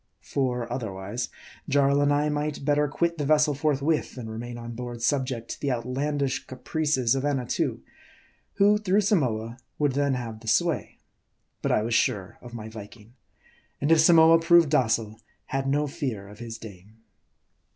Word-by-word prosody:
For, 125 -3 -1
otherwise, 110 0 -4 0.4
Jarl 140 0 +3
and 145 0 +3
I 145 +1 +2
might 150 -1 -3
better 150 0 +2
quit 170 +3 -1
the - - 0
vessel 150 0 +3
forth 140 -1 0
with, 155 0 0
than 115 -4 -7
remain 120 +2 -6
on 120 0 -7
board 120 0 -6
subject 130 -3 -1
to - - -7
the 140 - 0
outlandish 135 +3 -2
caprices 130 -2 0
of 135 0 -1
Annatoo, 135 -4 -1 0.7
who 205 +1 +4
through 205 0 +2
Samoa 125 - 0 0.2
would 145 -2 +2
then 140 0 +1
have 115 -3 -5
the 110 - -14
sway. 170 +8 0 0.6
But - - 0
I 105 - +2
was 115 +1 -2
sure 100 -4 0
of 120 - -11
my 110 -2 -7
Viking; 110 +1 -11 0.7
and 145 +3 0
if 165 - +6
Samoa 165 0 +7
proved 165 -2 +5
docile, 115 -6 +1 0.3
had 135 -1 -2
no 145 +2 +1
fear 130 - -4
of 105 - -13
his 115 -1 -7
dame. 105 -1 -12
135 Hz, 165 wpm, -26 LUFS, 115-150 Hz, 0.7 s, Samoa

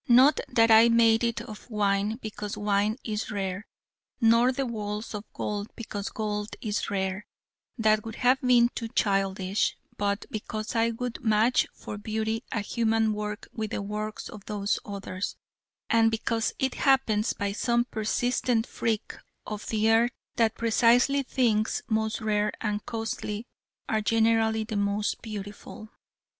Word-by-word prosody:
Not 260 +4 +6
that 230 -2 +4
I 225 +1 +8
made 230 0 +4
it 235 -1 0
of 215 +2 -10
wine 205 0 +1
because 210 -1 -5
wine 205 +1 +1
is 215 -2 -3
rare; 195 -1 -3 0.5
nor 230 +1 +5
the 270 +1 -2
walls 210 -2 -4
of 210 0 -7
gold 205 0 -3
because 205 -3 -5
gold 210 -1 -3
is 215 -1 -2
rare: 190 0 -2 0.5
that 215 -2 +3
would 225 -1 -7
have 255 +2 +3
been 245 -2 +5
too 230 - -4
childish: 195 -2 0 0.2
but 200 0 -1
because 215 +1 -4
I 230 0 +3
would 240 +2 -5
match 220 +2 +3
for 205 - -7
beauty 220 +2 -2
a 225 - -1
human 225 +1 +1
work 210 0 -5
with 220 -2 -3
the - - -3
works 210 +1 -4
of 210 -2 -10
those 205 -1 -1
Others: 195 -1 -5 0.5
and 225 -1 +4
because 225 0 -1
it 265 -1 0
happens, 245 -6 +2
by 200 0 -2
some 235 +3 +1
persistent 235 +1 0
freak 225 -2 -2 0.3
of 210 -1 -6
the 220 0 +2
earth, 230 +2 +4 0.2
that 225 -2 +2
precisely 240 +4 +4
things 230 -5 +1
most 220 0 0
rare 210 -1 +1
and 210 -1 -2
costly 225 -1 -4 0.4
are 220 -1 +1
generally 225 0 +2
the 215 -1 -4
most 205 +1 0
beautiful. 210 0 -8
220 Hz, 150 wpm, -27 LUFS, 210-230 Hz, 0.5 s, I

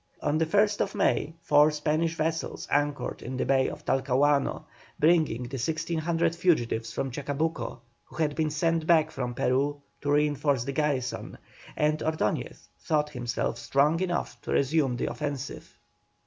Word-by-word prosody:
On 150 +2 0
the 160 - +1
1st 205 +2 +2
May 160 +2 +1
four 150 +1 +5
Spanish 155 +2 0
vessels 160 +1 -2
anchored 145 -3 0
in 130 +2 -5
the - - 0
Bay 135 -1 +3
of - - -9
Talcahuano, 140 +2 +2 0.4
bringing 155 -7 +3
the 125 +2 -5
1,600 165 +3 0
fugitives 120 -10 +1
from 135 +3 -3
Chacabuco, 140 -2 -3 0.2
who - - -16
had 155 -3 0
been 155 -1 +1
sent 160 +1 0
back 160 -2 +4
from 125 -2 -4
Peru 140 +4 +1 0.2
to 145 - -1
reinforce 145 -3 +2
the 140 - -3
garrison, 140 -3 -2 0.4
and 150 +1 +2
Ordoñez 155 -10 -2
thought 150 -1 0
himself 120 -3 -2
strong 150 +4 +2
enough 180 -2 -2
to - - -6
resume 140 -3 +2
the - - -1
offensive. 140 +2 -5
150 Hz, 150 wpm, -27 LUFS, 135-160 Hz, 0.4 s, four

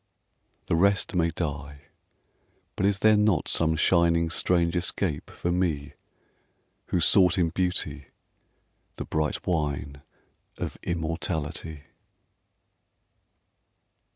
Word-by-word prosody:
The - - 0
rest 100 +3 +2
may 85 -2 +2
die 75 -3 -5 0.9
but 95 - +1
is 100 -1 +1
there 110 0 +7
not 105 -5 +2
Some 80 -1 +2
shining 85 0 +2
strange 85 0 +1
escape 90 -2 -2
for 85 - -3
me 80 -6 -1 0.9
Who 90 - 0
sought 90 0 +5
in 85 -2 +2
Beauty 80 -5 -2 0.9
the - - -6
bright 75 -1 -2
wine 70 -4 -2 0.6
Of - - -5
immortality? 80 -2 -4
85 Hz, 100 wpm, -26 LUFS, 75-90 Hz, 0.9 s, there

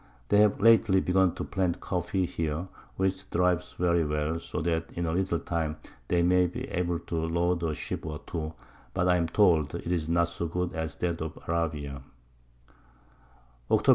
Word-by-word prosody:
They 105 - +5
have 105 -1 +4
lately 110 -2 +6
begun 95 -1 +2
to - - -3
plant 90 -3 -1
Coffee 90 +1 -1
here, 80 +1 -2 0.3
which 95 0 0
thrives 90 0 +1
very 85 -1 +2
well, 75 +2 -1
so 90 - -5
that 80 -1 -1
in 85 - -2
a 80 - 0
little 90 0 +1
time 80 -2 -2 0.3
they 85 -1 +2
may 90 +1 +4
be 85 - -5
able 90 -1 0
to - - -5
load 85 +2 +1
a 80 -2 -1
Ship - - -5
or 75 -1 -4
two; 80 -2 -4 0.4
but 90 - +2
I 90 0 +4
am 85 -1 +1
told 80 -6 +3
it 85 - -4
is 80 -3 -1
not 85 0 +3
so 85 0 -3
good 90 +2 -2
as 80 -2 -3
that 85 -2 -2
of 80 -1 -5
Arabia. 75 -4 -2 1.7
_Octob. - - +3
85 Hz, 180 wpm, -28 LUFS, 80-90 Hz, 1.7 s, lately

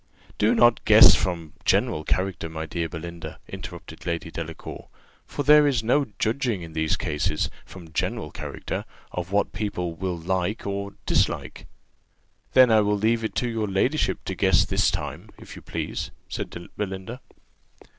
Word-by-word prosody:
"Do 105 - +4
not 120 -1 +5
guess 110 +1 +9
from 85 -5 -1
general 75 - +2
character, 95 -2 -1
my 80 0 -5
dear 85 +1 -3
Belinda," 85 -1 -7
interrupted 90 -2 -9
Lady 85 -1 -3
Delacour; 80 +1 -7 0.4
"for 145 - -3
there 150 +1 +7
is 125 -5 +1
no 140 +5 +3
judging, 115 -4 0
in 80 -1 -9
these 80 -1 0
cases, 75 -1 -1 0.2
from 85 -4 -12
general - - -2
character, - - -5 0.3
of 90 +1 -4
what 100 +1 +1
people 90 -5 -2
will 90 +1 -3
like 95 +5 -2
or 100 0 -3
dislike." - - 0 0.9
"Then 130 -2 +7
I 110 -1 +6
will 105 0 +1
leave 115 +2 +1
it 110 - -3
to 125 - 0
your 115 -2 -1
ladyship 115 +10 0
to - - -3
guess - - +4
this - - +2
time, - - -5
if - - -11
you - - -10
please," - - -4 0.2
said - - -4 0.3
Belinda. 100 +5 -5
95 Hz, 155 wpm, -25 LUFS, 85-110 Hz, 0.9 s, guess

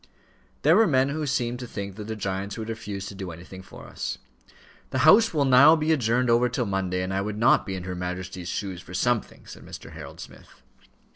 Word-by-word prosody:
There 155 +4 +6
were 220 +1 +5
men 135 -3 +3
who 150 +1 -3
seemed 125 -3 -1
to 125 - -6
think 100 -3 -6
that 105 0 -7
the 110 +1 -4
giants 100 0 -4
would 110 0 -5
refuse 105 -3 -5
to 100 - -7
do 95 -2 -6
anything 85 +3 -10
for 95 - -13
us. - - -5 0.7
"The - - -3
House 220 +8 +7
will 145 -4 +1
now 135 +5 +7
be 155 0 0
adjourned 125 -3 +2
over 120 +1 +3
till 125 0 -1
Monday, 95 -2 -1
and 95 +1 -3
I 95 - 0
would 105 +1 -4
not 115 +4 +3
be 95 - -3
in 90 - -5
her 90 0 -5
Majesty's 90 0 -5
shoes 95 -4 -4
for 90 - -10
something," 120 +3 -1
said - - -12
Mr. - - -10
Harold - - -10
Smith. - - -13
110 Hz, 220 wpm, -25 LUFS, 95-130 Hz, 0.7 s, House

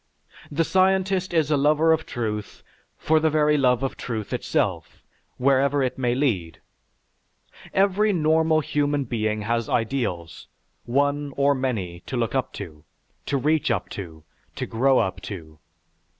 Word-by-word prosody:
The 160 +3 +1
scientist 190 +1 +2
is 160 -3 +1
a 150 - +4
lover 155 +3 +4
of 160 0 -2
truth 105 -3 -4 0.3
for 160 0 +2
the 160 0 +2
very 150 0 +3
love 125 -3 +2
of 135 - -3
truth 110 -4 -5
itself, - - -2 0.3
wherever 140 +1 +2
it 130 0 -2
may 120 -1 +1
lead. 100 - -1 1.1
Every 200 +2 +2
normal 160 -2 +2
human 145 -1 0
being 110 -4 -2
has 115 +1 -1
ideals, 110 - -2 0.4
one 145 +2 0
or 140 0 +4
many, 110 -10 -3
to 130 - -3
look 115 -2 -1
up 130 -2 -1
to, 80 -7 -9 0.4
to 140 - +1
reach 150 +2 +1
up 105 -5 -1
to, 80 -6 -8 0.3
to - - -3
grow 130 +3 +2
up 95 -4 0
to. 80 -6 -9
135 Hz, 145 wpm, -24 LUFS, 110-155 Hz, 1.1 s, a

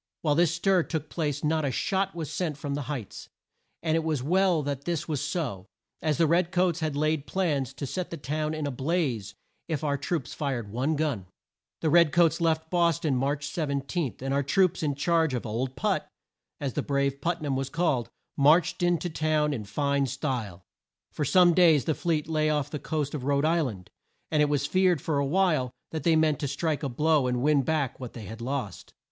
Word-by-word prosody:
While 150 -3 +3
this 170 +2 +3
stir 185 +1 +3
took 160 -2 -4
place 145 -4 -2
not 155 +1 +1
a 140 - +1
shot 190 +9 -1
was 160 -3 -4
sent 160 -6 -2
from 145 -1 -4
the 140 -3 -4
Heights, 130 -9 -6 0.5
and 160 -1 +1
it 165 - +1
was 155 -5 -1
well 180 0 +2
that 140 -1 -4
this 170 -2 -2
was 150 -4 -2
so, 140 - -3 0.3
as 155 -2 0
the 165 - +4
red 170 +2 +2
coats 180 -2 +1
had 155 -3 -2
laid 155 0 0
plans 150 -9 0
to 140 - -4
set 180 +6 -4
the 170 - -5
town 155 +2 -2
in 155 -1 -3
a 145 - -1
blaze 130 - -1 0.3
if 160 -2 -2
our 140 -2 0
troops 145 -2 -3
fired 125 -8 -3
one 130 +8 0
gun. 145 -11 -1 0.5
The 155 - +1
red 170 -2 +6
coats 170 0 +3
left 160 -1 0
Bos 170 -2 +3
ton 155 -5 0
March 140 +3 -1
17, 140 0 -2
and 135 +1 -2
our 140 - +2
troops, 185 +6 +2
in 145 -3 0
charge 160 -1 +1
of 120 - -4
"Old 125 +4 -3
Put" - - 0 0.5
as 135 -3 -3
the - - -1
brave 140 -1 -1
Put 170 +3 0
nam 140 -2 -1
was 135 0 -2
called 155 -7 0 0.3
marched 155 +6 +4
in 175 0 +3
to 175 - -4
town 155 -1 +1
in 110 -6 -4
fine 140 +6 0
style. 120 - -3 0.5
For 150 - -2
some 175 +3 +5
days 165 -6 +5
the 160 - +1
fleet 155 -2 -1
lay 155 -1 +1
off 150 -1 -1
the 150 - -3
coast 150 -2 -2
of 145 -4 -4
Rhode 140 +2 +1
Isl 160 -3 +2
and, 95 -5 -10 0.4
and 150 - +3
it 150 - +3
was 145 -1 +1
feared 185 -1 +3
for 145 +1 -1
a 140 - +1
while 155 -6 +2 0.2
that 160 - -3
they 165 +2 +3
meant 155 -3 +2
to 145 - -2
strike 145 +2 -1
a 140 - -2
blow 150 +2 +2
and 125 0 -1
win 150 -1 +4
back 140 -1 -1
what 125 -2 -7
they 115 - -8
had 110 +4 -8
lost. 125 -6 -4
150 Hz, 215 wpm, -27 LUFS, 135-165 Hz, 0.5 s, red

